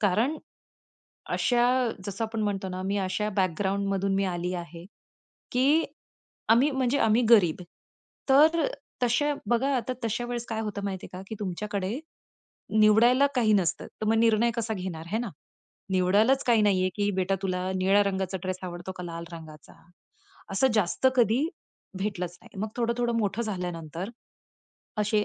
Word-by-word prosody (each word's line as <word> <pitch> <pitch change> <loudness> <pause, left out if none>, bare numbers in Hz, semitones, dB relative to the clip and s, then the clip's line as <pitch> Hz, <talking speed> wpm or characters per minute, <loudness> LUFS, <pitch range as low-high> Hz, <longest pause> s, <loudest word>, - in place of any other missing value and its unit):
कारण, 220 +9 +2 1.0
अशा 240 -1 +2 0.4
जसं 200 +3 -3
आपण 220 0 -3
म्हणतो 195 -2 -2
ना 185 0 -5
मी 200 +1 0
अशा 195 +2 -1
बॅकग्राऊंड 195 +2 0
मधून 195 0 0
मी 195 - +1
आली 180 -1 -2
आहे, 170 -1 -7 0.7
की, 280 +6 +4 0.7
आम्ही 240 +6 +5
म्हणजे 265 0 +1
आम्ही 225 0 +3
गरीब 180 -7 +5 0.7
तर 315 - +5 0.4
तसे 250 +5 +2 0.2
बघा, 265 +4 +2
आता 255 +1 -2
तशा 235 +2 -1
वेळेस 240 -1 -4
काय 220 -1 -2
होतं 210 -2 -4
माहितीये 190 -2 -4
का 185 - -7
की - - -5
तुमच्याकडे 200 +3 -3 0.8
निवडायला 235 +6 +6
काही 225 -3 +3
नसतं. 185 -5 0
तर 215 - -2
मग 220 - +3
निर्णय 230 +1 +4
कसा 225 -1 -1
घेणार 180 -4 -5
हे 220 - +1
ना? 235 -3 -3 0.6
निवडायलाच 205 +8 +3
काही 230 -3 +4
नाहीये 185 -3 +3
की 205 0 +1
बेटा 190 +1 +1
तुला 185 -1 -1
निळ्या 195 +2 +4
रंगाचा 190 -1 -2
ड्रेस 185 -1 -3
आवडतो 175 +1 -6
का? 180 - -6
लाल 170 -1 -6
रंगाचा? 155 -2 -11 0.8
असं 195 +7 +3
जास्त 210 +4 +1
कधी 240 +4 +3 0.5
भेटलंच 180 -3 -3
नाही. - - -14
मग 215 - -1
थोडं-थोडं 235 0 0
मोठं 220 +1 0
झाल्यानंतर, 180 -3 -4 0.9
असे 210 0 +2
205 Hz, 150 wpm, -27 LUFS, 185-235 Hz, 1.0 s, निवडायला